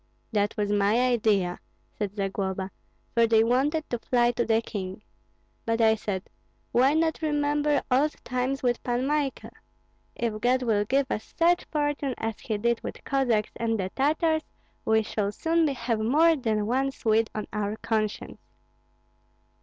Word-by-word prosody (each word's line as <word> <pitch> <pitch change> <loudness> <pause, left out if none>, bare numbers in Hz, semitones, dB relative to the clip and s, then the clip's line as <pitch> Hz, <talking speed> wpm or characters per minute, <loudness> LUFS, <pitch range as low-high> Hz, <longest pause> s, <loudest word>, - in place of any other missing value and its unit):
"That 205 -2 0
was 205 -1 0
my 205 +3 +3
idea," 215 -8 +2 0.4
said 205 -1 -4
Zagloba; 195 -1 -2 0.4
"for 230 -1 +4
they 220 -1 +5
wanted 280 +7 +1
to 240 - -1
fly 240 0 +2
to 240 0 0
the 225 -1 +2
king. 190 -4 -6 0.6
But 230 0 -1
I 220 -1 +5
said, 205 -3 -4 0.4
'Why 265 +5 +4
not 320 0 +1
remember 295 -1 +1
old 285 +4 +3
times 255 +2 -2
with 240 -1 +1
Pan 245 +1 -1
Michael? 290 -1 -1 0.6
If 220 -2 -2
God 255 +2 +2
will 210 -3 +1
give 270 +5 +2
us 215 - -5
such 345 +1 +3
fortune 290 -3 -1
as 225 -2 -3
he 215 - -3
did 235 +2 0
with - - -7
Cossacks 245 -6 +1
and 225 -1 -1
the 190 0 -2
Tartars, 315 +3 +2 0.4
we 220 0 +3
shall 205 -1 -2
soon 325 +7 +1
have 235 -5 -1
more 305 +9 +4
than 220 -6 -1
one 265 +5 +1
Swede 225 -3 +1
on 215 - -3
our 210 0 -1
conscience.'" 215 -2 -2
235 Hz, 155 wpm, -27 LUFS, 215-275 Hz, 0.6 s, they